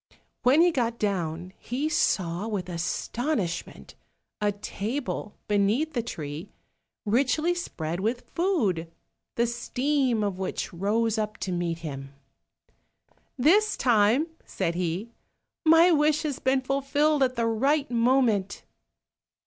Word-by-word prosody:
When 270 +6 +5
he 350 0 +5
got 235 -5 -1
down 180 -4 -2
he 265 +6 -2
saw 185 - 0
with 195 -5 -3
astonishment 180 - -3 0.5
a 205 0 +2
table 215 +3 -4
beneath 210 +10 +1
the 240 - 0
tree 155 -8 -6 0.6
richly 275 +10 +2
spread 170 - -4
with 230 +5 -2
food, 210 - 0 0.4
the 235 - +2
steam 245 0 0
of 195 -2 -2
which 190 - -3
rose 220 +5 0
up 215 0 -3
to 190 - -3
meet 175 -2 -1
him. 135 -2 -7 1.2
"This 385 +12 +4
time," 235 +4 +3 0.2
said 170 - -2
he, 180 +6 -3 0.6
"my 330 +3 +7
wish 305 -1 +3
has 290 -4 -3
been 260 0 +2
fulfilled 275 +3 +1
at 255 -1 +2
the 235 -1 0
right 270 +6 +1
moment." 230 -5 +2
230 Hz, 120 wpm, -26 LUFS, 190-275 Hz, 1.2 s, my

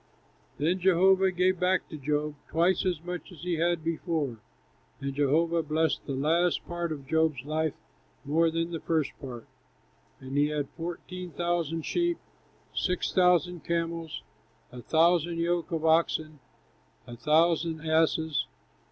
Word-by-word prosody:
Then 165 +6 +1
Jehovah 190 +1 +4
gave 185 0 +1
back 185 +1 +1
to 165 - -7
Job, 150 +1 -1 0.2
twice 175 +4 +2
as 175 -3 -1
much 180 +1 -6
as 170 - -12
he 175 -2 -1
had 170 0 +1
before. 160 -7 -2 0.6
And 140 0 -3
Jehovah 160 +4 +2
blessed 160 +1 0
the 135 - -2
last 165 +6 +1
part 175 -1 -3
of 140 -3 -5
Job's 160 -3 +1
life 155 0 -1 0.5
more 165 +4 +3
than 165 +1 -2
the 165 - -3
first 155 -3 0
part; 125 -4 -7 0.7
and 130 +1 -7
he 145 +1 +4
had 150 -2 -2
fourteen 175 +2 -6
thousand 170 -2 -1
sheep, 345 -1 0 0.6
six 180 -1 -1
thousand 180 -2 +3
camels, 165 -1 -3 0.5
a 125 0 -9
thousand 170 +3 +3
yoke 170 0 0
of 165 -1 -1
oxen, 160 -2 +2 0.7
and 120 -1 -10
a - - -26
thousand 160 +1 +2
asses. 160 -1 +2
165 Hz, 145 wpm, -28 LUFS, 150-175 Hz, 0.7 s, Jehovah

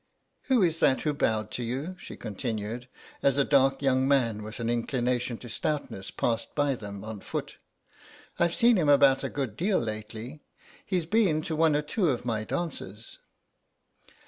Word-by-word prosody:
Who 255 -6 +4
is 165 -2 +1
that 130 - +4
who 150 - 0
bowed 110 -6 0
to 125 - -3
you?" 135 +10 -3
she - - -9
continued, 110 +3 -4 0.3
as 140 -1 +3
a 140 - +5
dark 135 -1 +3
young 130 -1 +3
man 120 -6 +2
with 110 +3 -8
an 115 - -2
inclination 120 0 0
to 120 - -10
stoutness 120 -5 -3
passed 115 -2 -2
by 145 -2 +2
them 100 -4 -7
on 110 -1 -6
foot; - - -5 0.8
"I've 170 0 +2
seen 235 -2 +5
him 155 -5 +2
about 140 -2 +5
a - - -1
good 130 -7 -3
deal 190 - +1
lately. 110 +5 -5 0.4
He's 180 -4 -1
been 175 -5 +2
to 160 - -2
one 160 -1 +4
or 150 - +1
two 175 +3 +1
of 125 -2 -1
my 110 -3 -1
dances." 115 - -5
130 Hz, 170 wpm, -28 LUFS, 115-155 Hz, 0.8 s, a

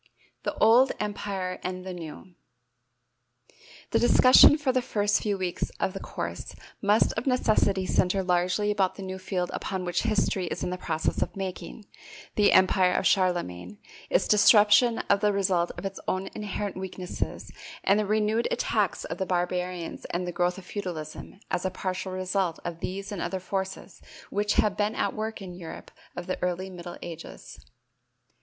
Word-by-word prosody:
The - - -3
Old 240 +4 +5
Empire 200 -3 -3
and 185 0 -4
the 185 - -5
New. 175 +1 -9 1.6
The - - +3
discussion 255 +4 +7
for 290 -3 +1
the 255 0 +1
first 205 -4 +1
few 205 -2 -1
weeks 185 -2 -2
of 190 - 0
the 195 - -5
course - - -6 0.3
must 205 +2 +3
of 225 +4 -4
necessity 215 -6 +2
center 185 +1 +1
largely 180 +3 +1
about 195 -3 +1
the 195 - -8
new 190 0 -5
field 185 -1 -2
upon 190 -1 -3
which 175 - 0
history 200 -4 0
is - - -4
in - - -2
the - - -1
process 160 -3 -1
of - - -2
making, 195 +2 -6 0.5
the 205 -1 +4
empire 185 -1 +4
of - - 0
Charlemagne, 180 - 0 0.3
its - - +2
disruption 215 +2 +5
as 200 - +4
the 210 +1 +2
result 185 -3 +1
of 175 - -6
its 195 0 -4
own 190 +1 -1
inherent 205 -2 -4
weaknesses 185 -1 -5 0.3
and 200 +2 +4
the 210 - 0
renewed 215 +2 +1
attacks - - 0
of - - -6
the 190 - -1
barbarians 180 -1 -2
and 175 +1 -3
the 175 - -3
growth 180 +1 0
of 190 - -10
feudalism 180 -3 -6
as 175 - 0
a 190 - 0
partial 185 0 -4
result 185 -2 -1
of 170 -1 -4
these 195 +4 -5
and 200 - -4
other 185 +2 -2
forces 190 +1 -5 0.3
which 205 +1 +1
have 210 -2 +2
been 210 +1 0
at - - 0
work 220 -1 -4
in 185 - -7
the 175 - -10
Europe 165 -2 -9 0.2
of 175 - -5
the 185 - -4
early 180 +1 -2
middle 175 -1 -8
ages. 165 -1 -9
190 Hz, 175 wpm, -27 LUFS, 180-210 Hz, 1.6 s, discussion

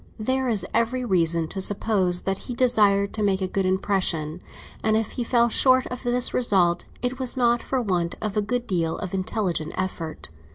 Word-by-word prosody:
There 260 +3 -1
is 205 -5 +1
every 240 +2 0
reason 170 -5 +1
to 195 - -3
suppose 190 -3 +1
that 195 0 -1
he 245 - -3
desired 205 -5 +3
to 215 - -3
make 195 -2 +1
a 190 - -1
good 190 0 -1
impression; 185 -4 -1 0.4
and 220 0 +2
if 220 -1 -2
he 245 - -3
fell 235 0 +3
short 255 +2 +4
of 250 - -5
this 245 0 +2
result, 180 -8 +2 0.2
it 250 +2 -2
was 260 0 -2
not 240 -1 +2
for 265 - -2
want 175 -5 -1
of 215 -1 -3
a 210 - +2
good 245 +4 -2
deal 170 -6 -1
of 185 -3 -6
intelligent 185 -4 -2
effort. 170 - -4
205 Hz, 195 wpm, -24 LUFS, 185-240 Hz, 0.4 s, short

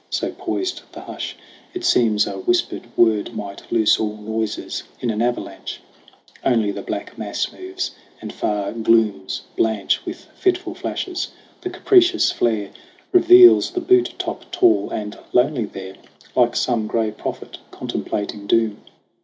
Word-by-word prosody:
So - - -1
poised 370 0 -3
the - - -8
hush, - - -6 0.4
it 360 -1 -4
seems 110 - +3
a - - -5
whispered 360 - 0
word 110 -1 +3
Might 100 -2 -7
loose 110 -2 +4
all 105 -1 -2
noises 110 0 -3 0.2
in 120 - -1
an 110 0 -2
avalanche. 120 +1 -3 0.6
Only 115 -5 +2
the - - -6
black - - -6
mass - - -2
moves, 370 0 -5 0.3
and - - -7
far 105 -1 -1
glooms 110 -4 +1
blanch 110 -3 +1
With - - -7
fitful 365 -1 0
flashes. 365 -1 -3 0.3
The 365 - -3
capricious 360 -1 +4
flare 110 -4 0 0.4
Reveals 360 0 +8
the 360 - -3
butte 370 +1 +3
top - - -5
tall 355 0 +3
and 105 -1 -5
lonely 125 -1 +3
there 95 -1 -9 0.4
Like - - +3
some 110 -2 0
gray 110 -1 0
prophet 105 - -6
contemplating 105 0 -4
doom. 110 -2 +2
115 Hz, 140 wpm, -21 LUFS, -, 0.6 s, Reveals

